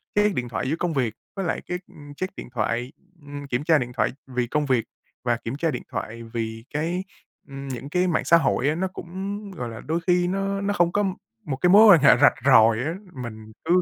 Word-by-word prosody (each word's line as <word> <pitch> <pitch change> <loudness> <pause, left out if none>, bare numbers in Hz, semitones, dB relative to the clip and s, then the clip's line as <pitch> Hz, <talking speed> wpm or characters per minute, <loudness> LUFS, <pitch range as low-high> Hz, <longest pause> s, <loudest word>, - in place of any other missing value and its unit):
cái 210 0 +4
điện 125 -1 -2
thoại 115 +3 -2
giữa 155 - +1
công 175 -2 -1
việc 125 -6 0 0.2
với 195 -2 -3
lại 160 - -1
cái, 180 - -2
ưm, 145 -1 -13
check 185 +3 -4
điện - - -8
thoại 120 +4 -1 0.3
ưm, 145 0 -8
kiểm 125 +1 -1
tra 160 0 +4
điện 125 -3 -3
thoại 120 - +1 0.2
vì 125 -2 -2
công 150 +4 0
việc 125 -4 +1 0.4
và 120 -1 +1
kiểm 115 +2 -5
tra 165 +1 0
điện 125 - -5
thoại 115 +2 -5
vì 115 0 -5
cái 170 +5 -1 0.4
ừm, 140 -1 -8
những 130 +1 -6
cái 180 +4 +1
mạng 165 - 0
xã 170 - +6
hội 140 -4 +1
á 155 - 0
nó 190 +3 -1
cũng, 190 +4 -5
gọi 125 -10 -5
là, 110 0 -8
đôi 160 +4 -1
khi 180 0 +3
nó 195 +1 -1
nó 205 +1 0
không 175 -3 +2
có 205 - +1 0.4
một 140 - -2
cái 180 +4 +2
mối 210 +4 +8
quan 165 - +5
hệ 140 -3 +7
rạch 145 - +7
ròi 115 -4 +6
á, 155 +6 -1 0.3
mình 110 -1 -9
cứ 180 +2 +4
145 Hz, 240 wpm, -24 LUFS, 120-175 Hz, 0.4 s, mối